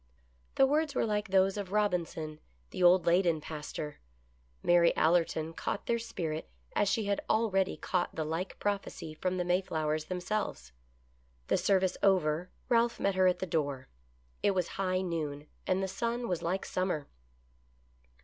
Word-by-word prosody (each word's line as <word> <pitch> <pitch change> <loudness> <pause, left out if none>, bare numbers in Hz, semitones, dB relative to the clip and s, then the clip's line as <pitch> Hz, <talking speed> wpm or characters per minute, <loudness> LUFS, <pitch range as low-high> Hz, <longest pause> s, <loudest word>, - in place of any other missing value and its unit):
The 270 - +6
words 295 +1 +1
were - - +2
like 210 -1 -1
those 190 +1 +3
of 195 -2 -4
Robinson, 170 -7 -1 0.3
the - - -5
old 180 +1 +6
Ley 175 +2 +5
den 170 -4 +1
pastor. 150 -1 -6 0.6
Mary 175 -1 +4
Allerton 165 -1 +2
caught 200 - -3
their 235 0 +1
spirit, 170 -9 -4 0.3
as 205 - +3
she 215 +2 +1
had 200 0 0
already 200 -4 +2
caught 180 -2 -1
the 160 - -1
like 165 +5 -3
prophecy 200 -6 -3
from 185 +3 -2
the 180 - -1
Mayflowers 155 -4 0
themselves. 180 - -3 0.8
The - - +4
service 190 -2 +2
over, 180 -3 +2 0.2
Ralph 235 0 +2
met 200 - +1
her 185 0 +4
at 180 - +3
the - - -3
door. 145 -6 -2 0.5
It 200 -1 +2
was 180 -2 0
high 185 -1 0
noon, 155 -5 -3 0.2
and 190 +1 +1
the - - 0
sun 235 +5 -2
was 180 -3 -1
like 185 +3 -1
summer. 180 -6 -1
185 Hz, 160 wpm, -31 LUFS, 160-200 Hz, 0.8 s, The